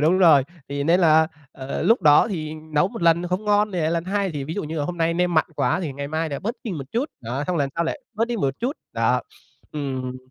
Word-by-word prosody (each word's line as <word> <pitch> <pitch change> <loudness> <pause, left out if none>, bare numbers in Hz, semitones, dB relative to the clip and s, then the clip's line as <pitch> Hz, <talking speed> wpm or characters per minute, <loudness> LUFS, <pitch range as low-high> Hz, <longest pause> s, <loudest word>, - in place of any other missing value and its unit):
đúng 165 +5 +3
rồi. 160 -7 +7 0.3
Thì 140 0 -2
nên 170 +4 +4
là, 160 -2 +5 0.3
ờ, 130 0 -5
lúc 230 +3 +3
đó 150 +7 +6
thì 155 -6 -4
nấu 155 +1 0
1 230 -3 -7
lần 170 +1 +3
không 185 +4 -2
ngon 210 0 +2
thì 180 - -2
lại 155 - +1
lần 170 0 -1
hai. 195 0 -1
Thì 145 -3 -4
ví 155 +4 -5
dụ 205 - -3
như 155 +1 -4
là 145 - -1
hôm 175 +2 -5
nay 165 0 +1
nêm 175 0 +1
mặn 160 - +4
quá - - +1
thì 155 -6 -3
ngày 140 +1 -5
mai 160 +2 -1
lại 140 -2 -4
bớt 230 +5 -2
đi 225 - -3
một 145 -5 -5
chút. 255 +7 0
Đó 125 +5 -3
xong 180 - 0
rồi 145 - +2
lần 135 - -1
sau 170 - 0
lại 165 - -3
bớt 225 +2 +1
đi 240 - -1
một 135 -8 0
chút. 260 +5 -1 0.2
Đó, - - +2 0.5
ừm. 130 -3 -3
165 Hz, 280 wpm, -23 LUFS, 145-185 Hz, 0.5 s, rồi